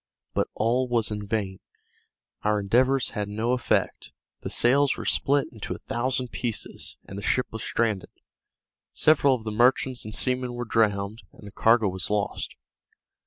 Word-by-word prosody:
But - - +1
all 120 +4 +1
was 115 -3 +1
in 105 -1 -4
vain; 100 -3 -2 0.8
our 105 0 +1
endeavors 125 +6 +2
had 105 -1 -3
no 110 +4 -1
effect; 125 -2 0 0.3
the - - -5
sails 135 +3 +4
were - - -6
split 140 0 +2
into 110 -4 -5
a - - -15
thousand 125 +1 -1
pieces, 120 -3 -4
and 100 - -7
the - - -7
ship 125 +4 +1
was 110 - -6
stranded; 110 -5 -1 0.8
several 140 -3 +4
of 115 - -8
the 110 - -4
merchants 125 +3 +2
and 110 +1 -5
seamen 125 -1 -1
were 120 0 -4
drowned, 105 -1 +1
and - - -15
the - - -10
cargo 115 0 +3
was 95 -1 -3
lost. 105 -1 -2
115 Hz, 165 wpm, -26 LUFS, 105-125 Hz, 0.8 s, sails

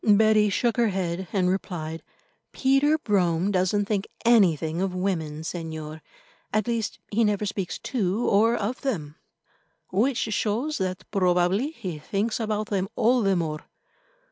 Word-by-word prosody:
Betty 215 0 +5
shook 235 +4 0
her 235 -1 +4
head, 185 -2 -2
and 185 -3 +1
replied: 165 -4 -3 0.5
"Peter 275 +3 +3
Brome 190 - +1
doesn't 190 +2 +1
think 205 -1 -1 0.2
anything 170 -8 +3
of 190 -1 -1
women, 165 -5 -2
Señor. 160 -2 -6 0.5
At 215 -1 +1
least 230 -3 -2
he 225 +2 +2
never 210 -1 +1
speaks 195 -4 -3
to 215 -2 -1
or 225 +4 +4
of 230 +4 -3
them." 165 - -3 0.8
"Which 235 +7 +2
shows 220 +7 -1
that 185 0 -2
probably 185 +5 +2
he 190 - -6
thinks 205 +9 -2
about 215 -1 -2
them 195 -2 -1
all 245 +2 +3
the 195 -2 +2
more. 155 -3 -2
200 Hz, 145 wpm, -25 LUFS, 180-220 Hz, 0.8 s, Betty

